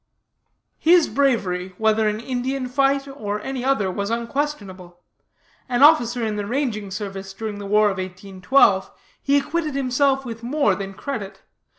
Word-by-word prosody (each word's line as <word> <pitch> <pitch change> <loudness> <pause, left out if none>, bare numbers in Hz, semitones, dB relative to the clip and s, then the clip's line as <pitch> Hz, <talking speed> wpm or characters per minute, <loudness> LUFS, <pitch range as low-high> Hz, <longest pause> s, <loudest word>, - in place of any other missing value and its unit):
"'His 335 0 +5
bravery, 190 -10 0
whether 220 0 +2
in 210 +1 -3
Indian 255 +2 -3
fight 275 +2 +1
or 210 -7 -4
any 265 +1 -4
other, 225 -8 +1
was 200 +2 -3
unquestionable. 230 -8 -4 0.7
An 250 +2 +2
officer 240 -6 +5
in 215 -1 -2
the 205 -1 -3
ranging 235 -5 -2
service 195 0 -6
during 210 0 -5
the 200 - -6
war 210 +1 +4
of 190 - -6
1812, 190 +3 +1 0.3
he 280 +1 +2
acquitted 300 +1 -2
himself 270 0 +1
with 230 -2 -7
more 250 -3 +1
than 195 +1 -6
credit. 215 -8 -6
230 Hz, 150 wpm, -22 LUFS, 200-275 Hz, 0.7 s, His